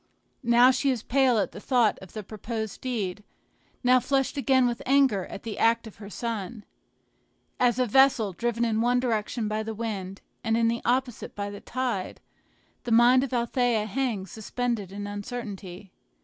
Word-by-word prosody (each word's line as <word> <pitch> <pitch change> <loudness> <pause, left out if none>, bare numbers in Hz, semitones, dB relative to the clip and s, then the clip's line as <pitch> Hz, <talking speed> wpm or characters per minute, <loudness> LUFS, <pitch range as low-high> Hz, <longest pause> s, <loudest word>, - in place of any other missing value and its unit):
Now 240 0 +6
she 265 +2 0
is 250 -5 -1
pale 260 -2 +3
at 205 - 0
the - - -9
thought 245 -5 +2
of 190 - -13
the 215 - -5
proposed 220 +1 -5
deed, 210 -6 -3 0.6
now 250 +1 +5
flushed 270 +2 0
again 265 -2 +3
with 240 -1 -1
anger 265 -8 +3
at - - -9
the 225 -2 -5
act 230 +1 +3
of 220 - -11
her 200 -1 -10
son. 220 0 -5 0.9
As 245 -1 +3
a 255 - +2
vessel, 245 -4 +4
driven 235 +4 -1
in 220 -1 0
one 245 +1 +3
direction 225 -2 -1
by 215 +1 -1
the 220 0 -5
wind, 200 -4 -5 0.2
and 225 -1 +1
in 230 0 +3
the 235 0 -2
opposite 250 0 -1
by 205 0 -4
the 205 0 -9
tide, 240 -7 -3 0.6
the 240 - -4
mind 240 +3 +6
of 275 - -4
Althea 240 -2 +1
hangs 215 -4 -2
suspended 225 -2 -3
in 205 +1 -6
uncertainty. 205 -3 -7
230 Hz, 175 wpm, -26 LUFS, 210-250 Hz, 0.9 s, Now